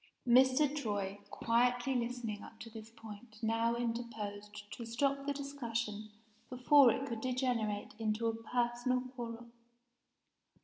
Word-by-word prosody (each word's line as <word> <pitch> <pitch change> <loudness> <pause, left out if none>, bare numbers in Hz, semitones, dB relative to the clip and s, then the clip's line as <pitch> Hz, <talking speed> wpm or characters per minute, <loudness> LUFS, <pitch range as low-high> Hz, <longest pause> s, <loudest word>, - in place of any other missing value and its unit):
Mr. 260 +4 +5
Troy, 205 -7 -2
quietly 245 +2 +2
listening 235 -4 -2
up 225 - -12
to 230 - -9
this 220 0 -9
point 225 0 -12
now 225 +1 +2
interposed 215 -3 -4
to 235 - -6
stop 275 +4 0
the - - +2
discussion 235 -7 -4 0.4
before 255 +1 +6
it 265 +4 0
could 230 -5 -4
degenerate 245 -5 -1
into 220 +1 0
a 225 - +2
personal 240 +2 0
quarrel. 235 -1 -6
235 Hz, 125 wpm, -34 LUFS, 220-250 Hz, 0.4 s, before